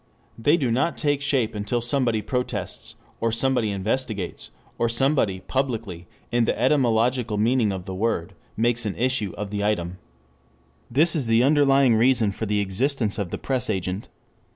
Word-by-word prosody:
They 145 +8 +3
do 130 -7 0
not 135 +8 +1
take 145 -3 0
shape 135 -5 +1
until 105 +3 -1
somebody 120 -3 +1
protests, 125 -1 -3 0.2
or 115 - 0
somebody 120 -1 +1
investigates, 105 -1 -3 0.3
or 115 - +2
somebody 120 -6 +1
publicly, 115 -11 -3 0.2
in 120 -1 +2
the - - -1
etymological 125 -3 +2
meaning 115 0 +2
of 95 -2 -5
the 95 - -5
word, 95 -4 -1 0.2
makes 120 +1 +1
an 100 - -3
issue 125 -6 0
of 100 0 -5
them. 100 -4 -1 0.9
This 155 +8 +3
is 140 -7 -1
the 115 +1 +4
underlying 135 -3 +4
reason 115 -2 +3
for 110 +2 -4
the 105 0 +1
existence 110 +3 -1
of 100 -4 -2
the - - -4
press 130 -2 -1
agent. 95 0 -3
115 Hz, 155 wpm, -24 LUFS, 105-130 Hz, 0.9 s, the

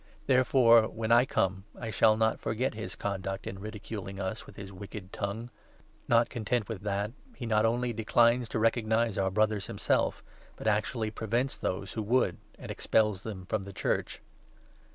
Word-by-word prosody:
There 130 -2 +4
10 - - -11
fore, 115 -4 +6
when 110 0 -3
I 120 +2 +7
come, 95 -5 0
I 115 -2 -4
shall 110 +1 +4
not 110 0 +2
forget 125 +4 -1
his 110 +1 -6
conduct 95 -1 -3
in 95 - -6
ridiculing 105 -2 -6
us 110 +8 -4
with - - -13
his 100 -1 -9
wicked 100 0 -9
tongue. 110 +4 -4 0.6
Not 115 0 +4
content 115 -2 -1
with 110 -5 -5
that, 100 +1 -1 0.2
he 120 - -6
not 110 -1 +3
only 120 +1 0
declines 115 +2 +3
to - - -2
recognize 115 -1 +2
our 95 0 +2
Brothers. 105 0 +1
himself, - - 0 0.3
but - - -10
actually 110 +1 0
prevents 120 +5 -1
those 95 +1 -3
who 110 - -2
would, 110 -4 +2 0.2
and - - -7
expels 105 -4 +1
them 100 -4 -7
from 110 +2 -1
the 100 0 -9
Church. - - -2
110 Hz, 175 wpm, -30 LUFS, 100-115 Hz, 0.6 s, I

